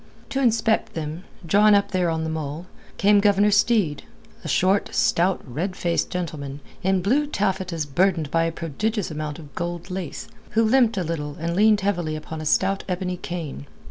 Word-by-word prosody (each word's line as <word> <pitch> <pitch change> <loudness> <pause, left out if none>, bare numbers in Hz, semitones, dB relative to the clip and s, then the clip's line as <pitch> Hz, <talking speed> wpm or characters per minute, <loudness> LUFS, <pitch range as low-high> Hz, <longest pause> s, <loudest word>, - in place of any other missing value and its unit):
To 270 - -1
inspect 225 -3 +1
them, 160 +2 -5 0.2
drawn 205 +5 +5
up 200 0 +1
there 180 -3 +1
on 160 -1 -1
the 160 - -2
mole, 155 +1 -4 0.3
came 205 +1 +5
Governor 205 0 +4
Steed, 205 -7 +2 0.4
a - - -6
short, 190 +2 +2
stout, 180 +2 +2
red 165 +9 -3
faced 170 -2 0
gentleman, 150 -6 -4 0.2
in 190 -1 +1
blue 280 +9 +2
taffetas 185 - -1
burdened 165 0 +1
by 165 0 +2
a 165 - 0
prodigious 175 +6 -2
amount 150 -1 -4
of 150 -4 -12
gold 175 +1 -4
lace, 180 -4 -5 0.3
who 225 - +6
limped 230 -1 +3
a 185 - +1
little 150 -3 -4
and 170 +1 -2
leaned 210 +1 +4
heavily 175 -6 -1
upon 155 +1 -6
a 155 - -3
stout 195 +5 +2
ebony 180 0 -2
cane. 165 - -6
180 Hz, 175 wpm, -23 LUFS, 160-200 Hz, 0.4 s, who